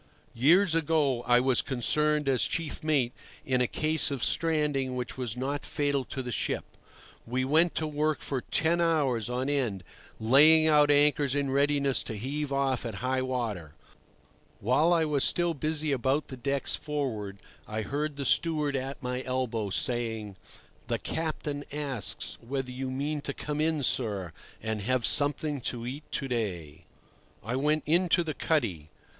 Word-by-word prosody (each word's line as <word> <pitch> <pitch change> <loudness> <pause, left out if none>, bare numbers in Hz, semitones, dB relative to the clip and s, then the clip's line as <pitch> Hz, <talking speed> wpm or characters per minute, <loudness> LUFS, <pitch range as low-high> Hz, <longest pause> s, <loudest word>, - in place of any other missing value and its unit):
Years 165 +9 +4
ago 150 -6 +1
I 120 0 +6
was 130 0 +2
concerned 150 +3 +1
as 130 -2 +2
chief 165 -3 -3
mate 140 -6 +1 0.3
in 130 -1 +1
a 125 - +2
case 155 +4 +1
of 140 -4 -3
stranding 150 -5 +1
which 125 -1 -4
was 125 -3 -3
not 140 +3 -2
fatal 145 -3 -1
to 130 +1 -5
the 125 - -5
ship. - - -1 0.6
We 130 +2 -1
went 160 +5 +3
to 160 - -1
work 150 0 -1
for 135 -3 -3
ten 170 +6 +1
hours 140 -9 +1
on 125 +2 -1
end, 125 -10 -1 0.4
laying 150 +8 +6
out 150 -2 +5
anchors 145 -1 +4
in 140 -2 0
readiness 140 -1 +2
to 110 - -5
heave 140 +6 -3
off 135 -2 0
at 115 -4 -5
high 130 0 +1
water. 110 - -3 0.8
While 130 - +3
I 165 -2 +3
was 145 -3 +1
still 175 -1 +1
busy 155 0 -1
about 135 +3 0
the 130 - -6
decks 140 +2 -1
forward 125 -10 -4 0.3
I 110 0 -3
heard 145 +4 -3
the 140 -1 -4
steward 150 -3 +2
at 135 +1 -4
my 125 0 -2
elbow 125 -5 -2
saying: 110 -2 -1 0.5
"The - - 0
captain 150 -3 -3
asks 140 -6 -3
whether 130 +1 -4
you 130 +1 -4
mean 145 +3 -2
to 140 - -5
come 150 0 -3
in, 155 -2 0
sir, 100 -9 0 0.3
and 110 -1 -2
have 125 +2 0
something 145 0 +2
to 120 -2 -6
eat 140 +5 -7
to 135 - -2
day." 95 - -4 0.6
I 115 +5 -3
went 150 +3 +1
into 175 +2 +3
the 155 -2 -3
cuddy. 105 - -1
135 Hz, 160 wpm, -28 LUFS, 125-150 Hz, 0.8 s, I